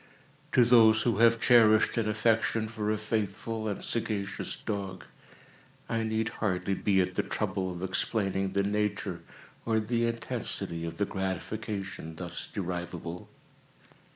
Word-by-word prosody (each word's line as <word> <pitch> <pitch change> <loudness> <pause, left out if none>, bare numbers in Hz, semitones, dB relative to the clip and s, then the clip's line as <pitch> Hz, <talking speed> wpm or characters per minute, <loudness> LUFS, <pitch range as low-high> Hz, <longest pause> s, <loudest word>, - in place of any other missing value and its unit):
To 125 - +6
those 110 -2 +6
who 115 -4 +1
have 115 0 +5
cherished 110 -3 +5
an 110 -2 0
affection 110 +1 +1
for 110 -1 -3
a 110 - +1
faithful 110 +1 -2
and 100 - -3
sagacious 105 -4 -2
dog, 100 -3 -5 0.8
I 115 0 -1
need 110 0 0
hardly 100 -3 -1
be 95 0 +2
at 90 - -1
the - - +1
trouble 95 -1 -2
of 90 0 -6
explaining 95 0 0
the 100 - +2
nature 100 -3 -1 0.4
or 110 -1 +1
the 115 +2 0
intensity 85 -7 -2
of 85 0 -6
the 100 - +1
gratification 95 -2 -4
thus 90 +1 -5
derivable. 90 -2 -5
105 Hz, 135 wpm, -29 LUFS, 95-110 Hz, 0.8 s, To